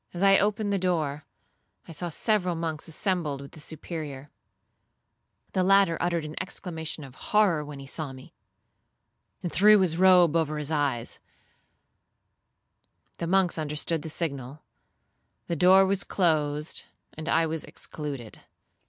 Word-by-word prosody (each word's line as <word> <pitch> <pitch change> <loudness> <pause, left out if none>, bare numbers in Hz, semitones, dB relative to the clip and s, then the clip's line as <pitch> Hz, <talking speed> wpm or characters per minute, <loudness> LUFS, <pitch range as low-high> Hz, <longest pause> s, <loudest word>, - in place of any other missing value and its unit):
As 175 - -1
I 195 0 +6
opened 205 0 0
the 200 - +1
door, 155 -5 -1 0.6
I - - -9
saw 170 +2 -4
several 185 0 0
monks 160 -1 -3
assembled 165 -4 -1
with 140 0 -10
the 155 - -13
Superior. 150 -2 -6 1.2
The 185 - +2
latter 195 -2 +4
uttered 170 -2 0
an 155 - -7
exclamation 165 -4 -5
of 135 -2 -11 0.2
horror 200 -8 +3
when 145 -1 -8
he 135 - -9
saw 145 +1 -3
me, 130 0 -13 1.1
and 175 - -2
threw 210 +2 +6
his 175 -3 +1
robe 180 -4 +6
over 155 -2 +1
his 150 0 -4
eyes; 140 -6 -1 2.0
the 170 - -2
monks 185 -2 +2
understood 155 +1 -2
the 160 - -6
signal; 140 -3 -4 0.8
the 170 - -2
door 185 +4 +6
was 195 0 0
closed, 150 -4 0 0.3
and 155 +1 -6
I 165 +1 +3
was 160 -1 -3
excluded. 140 -7 -7
160 Hz, 140 wpm, -27 LUFS, 150-185 Hz, 2.0 s, I